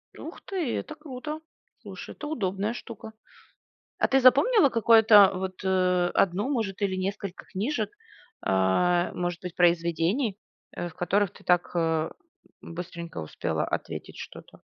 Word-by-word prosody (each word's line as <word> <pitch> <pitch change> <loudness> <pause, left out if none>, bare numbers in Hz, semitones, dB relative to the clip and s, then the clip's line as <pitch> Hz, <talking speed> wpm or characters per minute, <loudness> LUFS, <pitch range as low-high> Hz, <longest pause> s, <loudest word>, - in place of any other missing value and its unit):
Ух - - -9
ты, 350 -11 -2
это 310 - -6
круто! 300 0 -7 0.4
Слушай, - - -9
это 300 - -7
удобная 205 -6 -2
штука! 225 -2 -9 0.9
А - - +2
ты 270 - +4
запомнила, 280 - +6
какое-то, 220 -3 +7
вот, 185 0 -5
э, 180 -1 +2
1 195 +7 +1
может 220 -7 -2
или 190 -2 0
несколько 195 0 -4
книжек, 220 +10 -2 0.5
а, 135 - +2
может 175 -1 -3
быть 180 -1 -6
произведений, 175 - +2 0.4
э, 175 - -3
в 165 - -15
которых 195 +2 +1
ты - - -17
так, 175 -1 +2
э, 165 -1 +1 0.5
быстренько 170 - -7
успела 80 - -2
ответить - - -5
что-то? - - -11
190 Hz, 135 wpm, -27 LUFS, 175-235 Hz, 0.9 s, какое-то